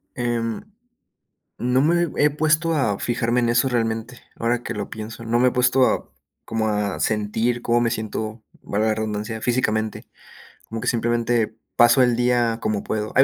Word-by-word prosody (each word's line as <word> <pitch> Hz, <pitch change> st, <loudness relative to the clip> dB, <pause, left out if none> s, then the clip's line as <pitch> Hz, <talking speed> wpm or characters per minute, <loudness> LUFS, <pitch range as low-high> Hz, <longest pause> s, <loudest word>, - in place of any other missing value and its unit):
Em, 120 Hz, -2 st, -2 dB, 1.0 s
no 125 Hz, +2 st, +2 dB
me 170 Hz, +3 st, +3 dB
he 150 Hz, -, +5 dB
puesto 155 Hz, +2 st, +1 dB
a 105 Hz, -9 st, 0 dB
fijarme 120 Hz, 0 st, 0 dB
en 120 Hz, -1 st, +1 dB
eso 120 Hz, +3 st, +3 dB
realmente, 115 Hz, 0 st, -2 dB
ahora 120 Hz, +1 st, -1 dB
que -, -, -4 dB
lo -, -, -5 dB
pienso, 110 Hz, +1 st, -7 dB
no 115 Hz, +1 st, +1 dB
me 125 Hz, +1 st, +5 dB
he -, -, -7 dB
puesto, 125 Hz, +1 st, +2 dB, 0.3 s
como 110 Hz, -1 st, -1 dB
a 105 Hz, -2 st, -1 dB
sentir 110 Hz, +3 st, 0 dB
cómo 120 Hz, 0 st, +2 dB
me 115 Hz, -, +1 dB
siento, 110 Hz, 0 st, -4 dB, 0.2 s
valga 105 Hz, +2 st, -1 dB
la 110 Hz, -, +1 dB
redundancia, 110 Hz, +1 st, -3 dB
físicamente, 110 Hz, -3 st, -1 dB, 0.6 s
como 115 Hz, 0 st, -5 dB
que, -, -, -4 dB
simplemente 120 Hz, -1 st, +1 dB, 0.2 s
paso 120 Hz, +3 st, +6 dB
el 125 Hz, -1 st, +3 dB
día 120 Hz, -1 st, +1 dB
como 105 Hz, -2 st, -1 dB
puedo. 105 Hz, 0 st, -3 dB
Hay 135 Hz, -, +7 dB
115 Hz, 170 wpm, -22 LUFS, 110-125 Hz, 1.0 s, Hay